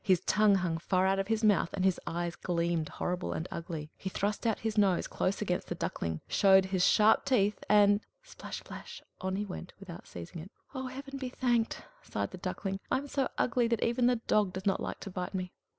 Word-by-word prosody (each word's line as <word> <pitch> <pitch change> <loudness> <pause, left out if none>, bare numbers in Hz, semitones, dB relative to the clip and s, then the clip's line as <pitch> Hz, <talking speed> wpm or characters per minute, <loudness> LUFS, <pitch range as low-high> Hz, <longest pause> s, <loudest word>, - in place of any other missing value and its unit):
His 185 -3 +3
tongue 210 0 +4
hung 175 -3 0
far 185 +2 +1
out 195 0 +2
of 195 - -1
his 225 0 0
mouth, 205 -5 +4
and 190 -1 0
his 190 -2 +3
eyes 170 0 -2
gleamed 170 -3 -1
horrible 180 0 -2
and 165 - -3
ugly; 160 -2 -5
he 190 - -3
thrust 205 +4 -1
out 225 - +2
his 220 -1 -3
nose 195 -4 +3
close 195 +3 -1
against 180 -3 -1
the - - -3
Duckling, 80 -1 -3
showed 190 -1 +5
his 190 -1 0
sharp 215 +3 +5
teeth, 210 -6 +1
and 205 0 +6 0.2
splash, - - -8
splash! - - -9 0.2
on 190 0 -2
he 205 +2 -2
went, 180 -2 -7
without 180 -4 -10
seizing 85 - -8
it. 180 - -10 0.2
"Oh, 260 -1 -4
Heaven 275 +1 -7
be 260 -2 -3
thanked!" 240 -3 0 0.2
sighed - - -3
the - - -8
Duckling. 195 -1 -3
"I - - +2
am 280 +2 -5
so 275 -1 0
ugly 245 -1 +2
that 230 -2 0
even 240 +1 +2
the 250 - +4
dog 210 -4 +1
does 190 0 -5
not 195 - +2
like - - -4
to 195 - -6
bite 180 +1 -4
me!" 185 -1 -3
195 Hz, 220 wpm, -31 LUFS, 180-220 Hz, 0.2 s, and